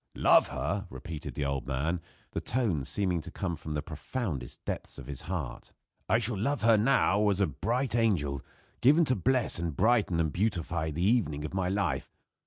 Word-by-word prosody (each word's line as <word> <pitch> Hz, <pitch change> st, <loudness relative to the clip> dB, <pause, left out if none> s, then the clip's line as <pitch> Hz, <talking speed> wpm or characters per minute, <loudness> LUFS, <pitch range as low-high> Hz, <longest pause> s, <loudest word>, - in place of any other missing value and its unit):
"Love -, -, +5 dB
her!" 100 Hz, +2 st, -2 dB
repeated 75 Hz, +4 st, -7 dB
the 75 Hz, -, -1 dB
old 70 Hz, -1 st, -2 dB
man, 75 Hz, +6 st, -1 dB, 0.3 s
the -, -, -3 dB
tones 95 Hz, -, 0 dB
seeming 90 Hz, -4 st, 0 dB
to -, -, -9 dB
come 90 Hz, -4 st, -3 dB
from 75 Hz, 0 st, -6 dB
the 75 Hz, -1 st, -2 dB
profoundest 80 Hz, -, -5 dB
depths -, -, -4 dB
of 70 Hz, -, -8 dB
his 70 Hz, 0 st, -6 dB
heart, 85 Hz, -9 st, -4 dB, 0.4 s
"I 110 Hz, -, +5 dB
shall 115 Hz, -3 st, -1 dB
love 135 Hz, +2 st, 0 dB
her 115 Hz, 0 st, +6 dB
now 105 Hz, -2 st, +3 dB
as 100 Hz, -1 st, +1 dB
a 100 Hz, -, +4 dB
bright 115 Hz, -, -1 dB
angel, 85 Hz, -, +1 dB, 0.4 s
given 150 Hz, +6 st, +6 dB
to 130 Hz, -, +2 dB
bless 125 Hz, 0 st, +1 dB
and 85 Hz, -3 st, -2 dB
brighten 110 Hz, -7 st, +3 dB
and 80 Hz, -2 st, +1 dB
beautify 85 Hz, -5 st, -1 dB
the 80 Hz, +4 st, -1 dB
evening 95 Hz, -10 st, +2 dB
of 75 Hz, -, -6 dB
my 95 Hz, -1 st, 0 dB
life! 100 Hz, +2 st, -1 dB
90 Hz, 190 wpm, -30 LUFS, 75-110 Hz, 0.4 s, her